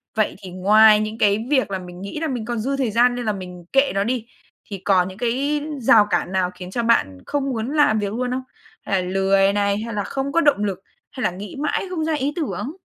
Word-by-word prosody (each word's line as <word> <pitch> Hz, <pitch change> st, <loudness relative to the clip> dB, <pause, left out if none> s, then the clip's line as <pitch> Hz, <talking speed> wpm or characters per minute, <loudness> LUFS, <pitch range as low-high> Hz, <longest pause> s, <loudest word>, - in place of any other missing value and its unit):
Vậy 215 Hz, -1 st, 0 dB
thì 185 Hz, -, -8 dB
ngoài 210 Hz, +3 st, +6 dB
những 215 Hz, +1 st, -3 dB
cái 215 Hz, +1 st, +2 dB
việc 260 Hz, -8 st, +2 dB
là 190 Hz, -, -2 dB
mình 180 Hz, 0 st, -10 dB
nghĩ 200 Hz, +10 st, -6 dB
là 320 Hz, -, -1 dB
mình 245 Hz, -5 st, -3 dB
còn 240 Hz, -2 st, -3 dB
dư 275 Hz, +5 st, -2 dB
thời 255 Hz, -5 st, 0 dB
gian 245 Hz, +3 st, +3 dB
nên 245 Hz, -, -4 dB
là 215 Hz, -, +1 dB
mình 180 Hz, -2 st, -9 dB
kệ 275 Hz, +1 st, +4 dB
nó 195 Hz, -, +2 dB
đi, 235 Hz, 0 st, -2 dB, 0.4 s
thì 200 Hz, -, -6 dB
còn 185 Hz, -2 st, +3 dB
những 190 Hz, +1 st, -10 dB
cái 270 Hz, +5 st, 0 dB, 0.2 s
rào 220 Hz, -3 st, +5 dB
cản 180 Hz, -, 0 dB
nào 185 Hz, -1 st, 0 dB
khiến 180 Hz, 0 st, -9 dB
cho 235 Hz, +2 st, -2 dB
bạn 95 Hz, -, +2 dB
không 275 Hz, -1 st, -2 dB
muốn 235 Hz, +1 st, -3 dB
làm 220 Hz, -8 st, +4 dB
việc 205 Hz, 0 st, -3 dB
luôn 250 Hz, +2 st, -2 dB
không? 260 Hz, +1 st, -2 dB, 0.4 s
Hay 190 Hz, -2 st, 0 dB
là 180 Hz, -, -5 dB
lười 195 Hz, +1 st, +3 dB
này, 200 Hz, 0 st, +1 dB
hay 230 Hz, +1 st, -5 dB
là 205 Hz, -1 st, -1 dB
không 270 Hz, +5 st, -3 dB
có 335 Hz, -, +3 dB
động 290 Hz, -10 st, +3 dB
lực, 195 Hz, -2 st, -2 dB, 0.3 s
hay 255 Hz, -, -6 dB
là -, -, +1 dB
nghĩ 195 Hz, +6 st, -8 dB
mãi 295 Hz, +5 st, -1 dB
không 320 Hz, -4 st, -2 dB
ra 320 Hz, -, 0 dB
ý 290 Hz, +1 st, -1 dB
tưởng? 295 Hz, -4 st, -3 dB
220 Hz, 255 wpm, -21 LUFS, 195-260 Hz, 0.4 s, ngoài